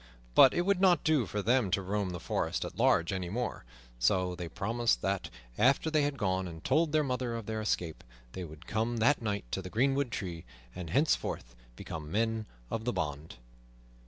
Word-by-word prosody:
But 130 Hz, -, +7 dB
it -, -, +3 dB
would 195 Hz, 0 st, +2 dB
not 185 Hz, -3 st, +5 dB
do 155 Hz, -, +2 dB
for 105 Hz, +3 st, -3 dB
them 120 Hz, -2 st, +3 dB
to 100 Hz, +2 st, +1 dB
roam 100 Hz, 0 st, -1 dB
the 90 Hz, -1 st, -5 dB
forest -, -, -1 dB
at -, -, -7 dB
large 85 Hz, +2 st, +3 dB
any 90 Hz, -2 st, -3 dB
more; 120 Hz, -, -3 dB, 0.3 s
so 90 Hz, +8 st, +2 dB
they 90 Hz, -1 st, -6 dB
promised 115 Hz, +7 st, 0 dB
that, 95 Hz, -1 st, -1 dB, 0.3 s
after 135 Hz, +6 st, +3 dB
they 155 Hz, -1 st, +3 dB
had 145 Hz, -1 st, 0 dB
gone 95 Hz, -3 st, 0 dB
and 80 Hz, -2 st, -9 dB
told 155 Hz, +3 st, +2 dB
their 155 Hz, 0 st, +3 dB
mother 125 Hz, -3 st, -2 dB
of 115 Hz, -2 st, -5 dB
their 110 Hz, 0 st, -3 dB
escape, 85 Hz, -6 st, -2 dB, 0.3 s
they 95 Hz, -, -6 dB
would 80 Hz, 0 st, -10 dB
come 115 Hz, +2 st, -1 dB
that 125 Hz, +6 st, +3 dB
night 105 Hz, -, -2 dB
to 95 Hz, -, -1 dB
the 90 Hz, -, -7 dB
greenwood 135 Hz, +5 st, +1 dB
tree, 85 Hz, -6 st, -5 dB, 0.3 s
and 90 Hz, -3 st, -6 dB
thenceforth 130 Hz, -, 0 dB, 0.2 s
become 75 Hz, +3 st, -7 dB
men 110 Hz, +1 st, 0 dB, 0.2 s
of 110 Hz, -, -2 dB
the 125 Hz, +1 st, -1 dB
band. 75 Hz, 0 st, -4 dB
110 Hz, 195 wpm, -31 LUFS, 90-130 Hz, 0.3 s, But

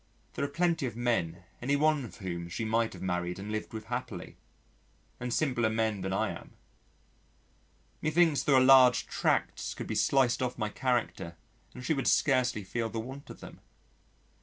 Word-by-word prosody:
There -, -, -3 dB
are -, -, +1 dB
plenty 170 Hz, -1 st, 0 dB
of 115 Hz, -, -6 dB
men 95 Hz, -8 st, -1 dB, 0.2 s
any 140 Hz, +4 st, +1 dB
one 150 Hz, -1 st, +2 dB
of 100 Hz, -, -11 dB
whom 85 Hz, -2 st, -5 dB
she 110 Hz, +6 st, -3 dB
might 115 Hz, +1 st, +1 dB
have -, -, -9 dB
married 90 Hz, -1 st, -2 dB
and 100 Hz, +2 st, -6 dB
lived 110 Hz, 0 st, -4 dB
with 110 Hz, -1 st, -7 dB
happily, 125 Hz, +1 st, -5 dB, 0.8 s
and 125 Hz, 0 st, -4 dB
simpler 120 Hz, -4 st, +1 dB
men 110 Hz, -2 st, 0 dB
than 95 Hz, +1 st, -3 dB
I 95 Hz, -, 0 dB
am. -, -, -10 dB, 1.5 s
Methinks 155 Hz, -1 st, +3 dB
there 145 Hz, -, +3 dB
are -, -, +7 dB
large 130 Hz, -1 st, +7 dB
tracts -, -, -1 dB
could -, -, -5 dB
be -, -, -4 dB
sliced 130 Hz, -3 st, +2 dB
off 125 Hz, -1 st, -2 dB
my 110 Hz, -2 st, -1 dB
character 120 Hz, -8 st, -1 dB, 0.4 s
and 125 Hz, -, -8 dB
she 160 Hz, -, +2 dB
would 135 Hz, -3 st, -2 dB
scarcely 125 Hz, -6 st, +2 dB
feel 115 Hz, +4 st, -3 dB
the 115 Hz, -, -4 dB
want 135 Hz, +5 st, -8 dB
of -, -, -11 dB
them. -, -, -11 dB
120 Hz, 180 wpm, -30 LUFS, 105-135 Hz, 1.5 s, are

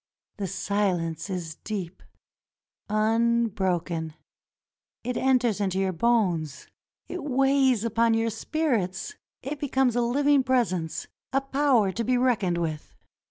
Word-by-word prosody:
The 200 Hz, -2 st, -3 dB
silence 185 Hz, -3 st, -1 dB
is 170 Hz, -4 st, -4 dB
deep 190 Hz, -4 st, -5 dB, 0.5 s
— -, -, -54 dB
unbroken. 215 Hz, -7 st, 0 dB, 0.9 s
It 250 Hz, +1 st, -2 dB
enters 245 Hz, -5 st, +2 dB
into 190 Hz, -2 st, 0 dB
your 190 Hz, -1 st, +1 dB
bones; 175 Hz, -, 0 dB, 0.4 s
it 360 Hz, -, -5 dB
weighs 270 Hz, -3 st, +3 dB
upon 230 Hz, 0 st, +2 dB
your 225 Hz, 0 st, +1 dB
spirits; 245 Hz, -, -1 dB, 0.3 s
it 280 Hz, +3 st, -4 dB
becomes 265 Hz, -4 st, +1 dB
a 245 Hz, -, +2 dB
living 280 Hz, +4 st, +3 dB
presence, 230 Hz, -11 st, 0 dB, 0.3 s
a 270 Hz, -, +3 dB
power 270 Hz, -6 st, +2 dB
to 230 Hz, +5 st, -3 dB
be 250 Hz, +2 st, +2 dB
reckoned 220 Hz, -9 st, +1 dB
with. 160 Hz, -3 st, -4 dB
225 Hz, 120 wpm, -26 LUFS, 185-255 Hz, 0.9 s, weighs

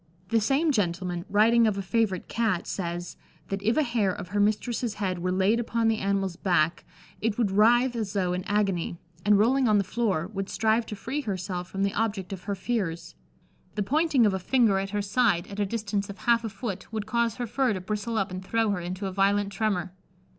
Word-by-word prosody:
The 225 Hz, 0 st, +3 dB
same 280 Hz, +8 st, +2 dB
gentleman, 180 Hz, -5 st, -1 dB
writing 225 Hz, +3 st, +5 dB
of 205 Hz, -2 st, 0 dB
a 195 Hz, -, -2 dB
favourite 190 Hz, -1 st, 0 dB
Cat, 220 Hz, -7 st, 0 dB
says, 175 Hz, -2 st, -4 dB, 0.3 s
that 195 Hz, 0 st, -2 dB
if 225 Hz, +6 st, +1 dB
a 310 Hz, -, +4 dB
hair 230 Hz, -7 st, +1 dB
of 180 Hz, -, -7 dB
her 205 Hz, -, -1 dB
mistress's 215 Hz, +2 st, 0 dB
head 185 Hz, -3 st, -2 dB
were 180 Hz, +1 st, -1 dB
laid 195 Hz, +5 st, +2 dB
upon 230 Hz, -1 st, +1 dB
the 220 Hz, -1 st, +1 dB
animal's 195 Hz, -2 st, 0 dB
back 170 Hz, -3 st, +1 dB, 0.4 s
it 220 Hz, -1 st, 0 dB
would 225 Hz, -5 st, +1 dB
writhe 240 Hz, +5 st, +4 dB
as 215 Hz, -3 st, -3 dB
though 185 Hz, -3 st, 0 dB
in 180 Hz, 0 st, -2 dB
agony, 195 Hz, -5 st, 0 dB, 0.3 s
and 210 Hz, 0 st, +5 dB
rolling 250 Hz, +5 st, +3 dB
on 215 Hz, -1 st, +4 dB
the 200 Hz, -, +2 dB
floor, 195 Hz, -6 st, -1 dB
would 195 Hz, -1 st, -3 dB
strive 225 Hz, +1 st, +1 dB
to 210 Hz, -, -5 dB
free 265 Hz, +8 st, -3 dB
herself 185 Hz, -5 st, -4 dB
from 195 Hz, 0 st, -2 dB
the 200 Hz, -, 0 dB
object 205 Hz, -4 st, -2 dB
of 185 Hz, -2 st, -8 dB
her 200 Hz, -1 st, -2 dB
fears. 185 Hz, -5 st, -3 dB, 0.6 s
The 210 Hz, -, 0 dB
pointing 290 Hz, -, +3 dB
of 205 Hz, -, +3 dB
a 190 Hz, -, -1 dB
finger 215 Hz, 0 st, +3 dB
at 195 Hz, 0 st, -3 dB
her 205 Hz, 0 st, -2 dB
side, 200 Hz, -4 st, +2 dB
at 200 Hz, +1 st, -8 dB
a 205 Hz, -, +1 dB
distance 205 Hz, -2 st, -2 dB
of 200 Hz, -, -7 dB
half 235 Hz, +1 st, +2 dB
a 225 Hz, -, -3 dB
foot, 200 Hz, -1 st, -6 dB
would 215 Hz, -2 st, -3 dB
cause 230 Hz, 0 st, 0 dB
her 245 Hz, -, -3 dB
fur 250 Hz, +1 st, +1 dB
to 185 Hz, -, -4 dB
bristle 210 Hz, +4 st, -3 dB
up 195 Hz, -3 st, 0 dB
and 185 Hz, +1 st, -5 dB
throw 225 Hz, +2 st, +1 dB
her 200 Hz, -, -1 dB
into 180 Hz, +3 st, -5 dB
a 190 Hz, -, -2 dB
violent 200 Hz, +1 st, +2 dB
tremour. 190 Hz, -4 st, -1 dB
205 Hz, 220 wpm, -27 LUFS, 190-230 Hz, 0.6 s, writing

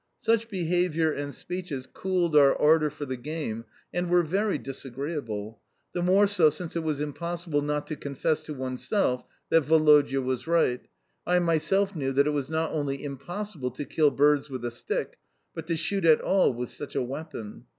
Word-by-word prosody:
Such 230 Hz, 0 st, +1 dB
behaviour 175 Hz, -3 st, +1 dB
and 145 Hz, -1 st, -4 dB
speeches 170 Hz, -6 st, -5 dB
cooled 180 Hz, -2 st, -1 dB
our 140 Hz, -2 st, +6 dB
ardour 155 Hz, 0 st, +4 dB
for 150 Hz, 0 st, -7 dB
the 130 Hz, -2 st, -4 dB
game 120 Hz, -4 st, -4 dB, 0.3 s
and 175 Hz, 0 st, -1 dB
were 175 Hz, 0 st, +4 dB
very 195 Hz, +5 st, 0 dB
disagreeable 135 Hz, -5 st, -5 dB, 0.3 s
the 175 Hz, -, -1 dB
more 190 Hz, +3 st, +5 dB
so 190 Hz, -6 st, +4 dB
since 160 Hz, +3 st, -6 dB
it -, -, +1 dB
was 155 Hz, -3 st, -2 dB
impossible 165 Hz, +1 st, -2 dB
not 150 Hz, 0 st, -1 dB
to 155 Hz, +1 st, -5 dB
confess 145 Hz, +2 st, -1 dB
to 155 Hz, -, -5 dB
oneself 130 Hz, -, -1 dB, 0.3 s
that 165 Hz, -3 st, +4 dB
Woloda 150 Hz, -3 st, +5 dB
was 130 Hz, +2 st, -2 dB
right, 165 Hz, -7 st, +2 dB, 0.5 s
I 180 Hz, -, +4 dB
myself 180 Hz, +4 st, +2 dB
knew 135 Hz, -4 st, -1 dB
that 140 Hz, +1 st, +4 dB
it 150 Hz, -, +1 dB
was 145 Hz, -2 st, -2 dB
not 160 Hz, 0 st, -1 dB
only 145 Hz, -3 st, -2 dB
impossible 145 Hz, +2 st, -5 dB
to 130 Hz, +4 st, -6 dB
kill 150 Hz, 0 st, +3 dB
birds 145 Hz, +1 st, +3 dB
with 130 Hz, -3 st, -5 dB
a 120 Hz, -, -2 dB
stick, 120 Hz, -, -4 dB, 0.3 s
but 165 Hz, -1 st, -7 dB
to 165 Hz, -, 0 dB
shoot 190 Hz, +4 st, -1 dB
at 160 Hz, -2 st, +6 dB
all 190 Hz, -5 st, +3 dB
with 125 Hz, 0 st, -5 dB
such 145 Hz, -, -7 dB
a -, -, +1 dB
weapon. 135 Hz, -4 st, -7 dB
150 Hz, 180 wpm, -27 LUFS, 135-170 Hz, 0.5 s, our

